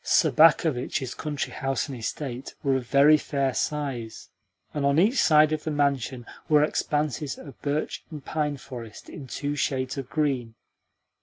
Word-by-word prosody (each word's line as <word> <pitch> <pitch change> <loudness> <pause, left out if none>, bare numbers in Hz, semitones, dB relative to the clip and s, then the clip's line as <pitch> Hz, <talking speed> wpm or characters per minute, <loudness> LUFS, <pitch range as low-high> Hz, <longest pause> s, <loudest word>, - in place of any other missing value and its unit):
Sobakevitch's 150 -5 +3
country 150 -3 -4
house 135 -4 -1
and 135 - -6
estate 125 +2 -5
were 135 -1 +2
of 125 -2 -3
very 145 +4 +6
fair 140 -3 -1
size, 135 -8 -3 0.4
and 145 - -2
on 140 +1 +3
each 215 +10 +4
side 155 -1 +5
of 155 - -3
the - - -2
mansion 140 -4 0 0.2
were 150 -1 +5
expanses 150 -2 -1
of 140 -4 -12
birch 145 +1 -2
and 150 -4 -9
pine 150 -2 -1
forest 120 -5 -10
in 135 - -9
two 145 +3 -3
shades 130 -1 -1
of 130 -2 -7
green. 135 -7 -1
140 Hz, 155 wpm, -26 LUFS, 130-150 Hz, 0.4 s, very